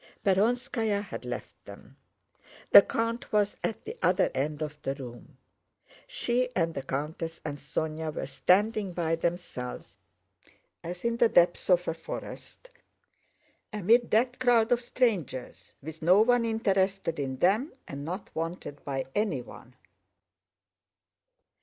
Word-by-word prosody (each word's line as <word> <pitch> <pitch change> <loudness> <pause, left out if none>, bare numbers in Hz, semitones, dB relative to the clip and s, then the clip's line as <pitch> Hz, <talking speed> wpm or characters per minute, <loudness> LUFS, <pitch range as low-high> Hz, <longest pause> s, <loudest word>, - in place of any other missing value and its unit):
Perónskaya 215 +1 +1
had - - -8
left - - -7
them. - - -13 0.8
The - - +12
count 230 +1 -2
was 210 -1 +2
at 225 0 -3
the - - -7
other 185 +2 +3
end 150 +3 -2
of 150 -1 -7
the 135 - -2
room. 125 -3 -10 0.7
She 250 - 0
and 165 -2 +1
the 135 - -3
countess 150 +5 -4
and 145 -2 -4
Sónya 155 +2 -3
were - - -4
standing 195 - +2
by 165 -2 0
themselves 165 -7 -4 0.8
as 175 +4 -6
in 235 0 +1
the 235 -1 +4
depths 175 -1 +3
of 180 -1 +4
a - - 0
forest 170 - -9 1.0
amid 220 +4 +3
that 245 +3 +2
crowd 240 -2 +4
of 245 0 +3
strangers, 210 - -2
with 160 +2 -8
no 180 +6 +6
one 245 +1 +3
interested 195 -6 0
in 135 -2 -3
them 210 - +2 0.2
and 140 0 -6
not 180 +6 -6
wanted 165 -3 -5
by 135 -2 -3
anyone. 140 - -3
180 Hz, 130 wpm, -28 LUFS, 155-225 Hz, 1.0 s, The